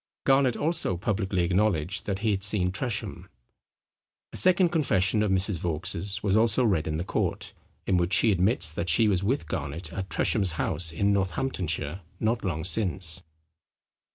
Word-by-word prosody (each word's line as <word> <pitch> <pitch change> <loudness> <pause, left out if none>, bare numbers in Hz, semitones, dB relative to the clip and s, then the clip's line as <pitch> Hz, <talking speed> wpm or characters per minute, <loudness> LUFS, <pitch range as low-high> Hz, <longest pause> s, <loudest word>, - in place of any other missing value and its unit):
Garnet 135 -2 +2
also 155 - -1
publicly 95 -1 -1
acknowledged 95 -1 0
that 100 -2 -2
he 110 - +3
had 100 -1 -1
seen 95 -3 +3
Tresham. 110 +3 -5 1.0
A - - -8
second 185 -1 +4
confession 110 - +1
of 105 - 0
Mrs 95 -1 0
Vaux's 85 +3 -3
was 100 -1 +1
also 115 +3 +3
read 95 -8 0
in 80 -1 -2
the 85 - -3
court, - - -3 0.3
in 95 - +1
which 85 +2 0
she 115 - +4
admits 95 -3 +2
that 85 +2 -3
she 110 +7 +3
was 95 -3 0
with 130 +8 -1
Garnet 75 +3 -5
at 95 -1 -5
Tresham's 95 +1 +1
house 80 +1 +2
in 100 +5 +1
Northamptonshire 95 - -2 0.2
not 115 +2 -1
long 80 -5 -3
since. 90 -4 +2
95 Hz, 160 wpm, -26 LUFS, 85-110 Hz, 1.0 s, second